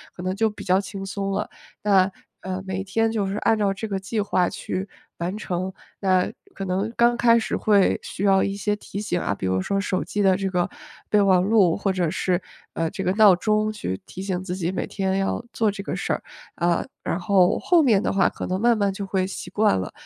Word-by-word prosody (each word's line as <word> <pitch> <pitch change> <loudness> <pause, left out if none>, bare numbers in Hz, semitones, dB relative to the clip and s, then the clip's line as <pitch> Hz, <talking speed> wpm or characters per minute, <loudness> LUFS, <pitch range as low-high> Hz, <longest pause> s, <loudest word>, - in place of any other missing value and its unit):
可 - - -8
能 185 +1 -1
就 220 +2 +2
比 210 - -9
较 185 +1 +3
轻 195 -1 -7
松 195 +1 -3
了。 195 - -2 0.3
那， 195 -2 +4 0.3
呃， 190 0 -4
每 190 0 -2
天 225 +4 0
就 215 -3 0
是 195 +1 -3
按 225 -1 +2
照 200 -2 +1
这 220 +3 -5
个 195 -2 -2
计 195 +4 -3
划 185 -3 +1
去 190 +2 -4 0.3
完 175 +4 -3
成。 185 -2 -3 0.3
那 185 -2 +2 0.2
可 195 - -5
能 195 +4 -1
刚 235 0 +4
开 235 -1 +5
始 225 - -2
会 205 -3 +3
需 195 - -5
要 195 -1 +4
一 200 0 -1
些 205 +1 -1
提 205 -1 -7
醒 190 -4 -1
啊， 100 - -1
比 100 - -5
如 95 0 +1
说 195 - -1
手 185 -2 -1
机 205 - -2
的 190 -2 +4
这 195 -1 -2
个 180 -1 0 0.4
备 210 - +4
忘 190 -2 +4
录 195 -5 +4
或 200 -1 0
者 175 -3 0
是， 180 -2 0 0.3
呃， 165 0 -1
这 - - -4
个 185 - +1
闹 205 -3 +7
钟 215 +3 +1
去 150 - -4
提 185 - -8
醒 185 -2 -2
自 180 -1 -4
己 175 -1 -2
每 190 - -2
天 190 -1 -1
要 195 +4 -1
做 220 -2 +2
这 200 0 -6
个 - - -4
事 - - -1
儿。 - - -3 0.3
啊， 170 0 +1 0.2
然 - - -1
后 185 0 +3
后 345 -2 +4
面 225 -7 +3
的 - - 0
话 195 -2 +4
可 - - -6
能 185 +1 -2
慢 235 -1 +4
慢 200 -2 +1
就 200 - -5
会 190 -1 0
习 190 - -6
惯 210 - +2
了， 90 - -4
195 Hz, 255 characters per minute, -24 LUFS, 185-210 Hz, 0.4 s, 闹